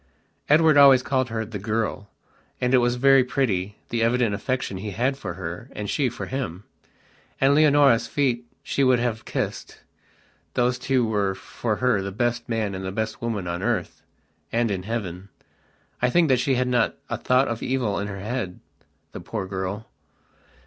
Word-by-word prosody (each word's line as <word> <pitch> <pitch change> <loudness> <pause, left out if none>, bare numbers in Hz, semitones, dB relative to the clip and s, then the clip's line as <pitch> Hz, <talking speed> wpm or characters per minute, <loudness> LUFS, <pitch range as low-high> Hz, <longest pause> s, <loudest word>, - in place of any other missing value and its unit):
Edward 155 0 +5
always 135 -3 +8
called 130 -2 0
her 110 0 -2
"the 105 -1 -6
girl", 105 -1 -2 0.5
and 125 +1 0
it 130 - +7
was 120 0 +1
very 135 +1 +5
pretty, 105 -7 -1
the 115 0 -1
evident 115 -1 +2
affection 125 -2 -2
he 105 +3 -5
had 130 +7 0
for 95 -10 -6
her 90 +6 -6
and 105 - -5
she 135 -4 +1
for 120 - -6
him. 100 -9 -4 0.8
And 135 +1 +4
Leonora's 145 -6 +5
feet 125 -3 0 0.2
she 140 - 0
would 130 -1 +5
have 120 -2 -2
kissedthose 125 0 -5
two 130 -2 +1
were 100 -3 0
for 110 +3 -3
her 125 -3 +1
the 100 0 -4
best 120 +3 -1
man 110 -3 -1
and 95 0 -5
the 95 - -3
best 110 +3 -3
woman 110 -5 -2
on 85 +1 -3
earthand 115 0 -3
in 95 -2 -2
heaven. 100 -3 -5 0.7
I 125 - +3
think 165 +3 +3
that 130 -2 +4
she 135 +1 +1
had 125 0 +1
not 125 -1 +1
a - - -2
thought 130 +2 +2
of 115 -1 -3
evil 125 -7 -1
in 100 - -3
her 100 -1 -6
headthe 105 -4 -3 0.7
poor - - -4
girl.... 95 +3 -4
115 Hz, 170 wpm, -24 LUFS, 100-130 Hz, 0.8 s, always